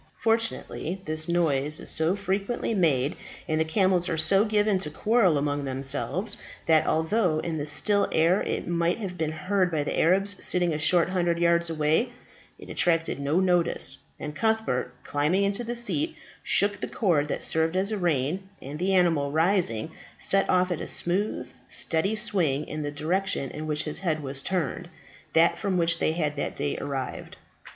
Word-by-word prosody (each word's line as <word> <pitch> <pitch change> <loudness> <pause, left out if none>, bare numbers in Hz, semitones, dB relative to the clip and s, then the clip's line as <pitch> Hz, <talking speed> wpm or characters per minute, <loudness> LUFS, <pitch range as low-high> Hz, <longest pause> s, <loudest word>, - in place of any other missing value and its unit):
Fortunately 225 -5 -1
this 155 0 -1
noise 155 -4 +1
is - - -3
so 160 +4 +1
frequently 200 +4 -2
made, 150 -8 +2 0.3
and 155 -1 +1
the - - +4
camels 185 +1 +2
are 165 - -1
so 195 +6 +4
given 210 -2 +2
to 155 - -3
quarrel 205 -1 +2
among 145 0 -1
themselves, 140 +9 -1 0.3
that 160 -1 +4
although 160 +1 +1
in 160 0 -3
the 145 - -3
still 200 +7 +2
air 170 +5 +3
it - - -3
might 170 0 +1
have 195 -5 -5
been 160 -3 -2
heard 185 +4 0
by 155 -3 -1
the - - -2
Arabs 195 +3 +2
sitting 175 -2 +2
a 150 - -2
short 170 +3 +3
hundred 175 -2 0
yards 170 0 +2
away, 160 +8 +1 0.5
it - - -12
attracted 165 -4 0
no 145 +5 +1
notice, 180 -2 +1 0.2
and 150 0 -6
Cuthbert, 220 - 0
climbing 150 +7 +1
into 200 +4 0
the 240 +1 -4
seat, 290 +7 -2 0.3
shook 205 0 +1
the - - -3
cord 165 -9 +1
that - - -3
served 160 +2 +1
as 195 +3 0
a 215 - -1
rein, 175 +3 -1
and 145 +3 -8
the 190 +2 +1
animal, 165 -6 +2
rising, 160 - +1 0.3
set 195 0 +1
off 180 0 +3
at 175 - -2
a - - -5
smooth, 190 +5 -2
steady 190 +6 +1
swing 175 -10 0
in 155 - -5
the 145 - -3
direction 155 -1 -1
in 155 +1 -6
which 150 0 -1
his 155 - -3
head 160 -5 -1
was 135 0 -4
turned 175 0 -2 0.4
that 165 +1 +4
from 195 -2 0
which 170 -1 +2
they 155 - +1
had 155 -3 -1
that - - -3
day 145 0 -2
arrived. 135 -2 -5
170 Hz, 180 wpm, -26 LUFS, 150-195 Hz, 0.5 s, the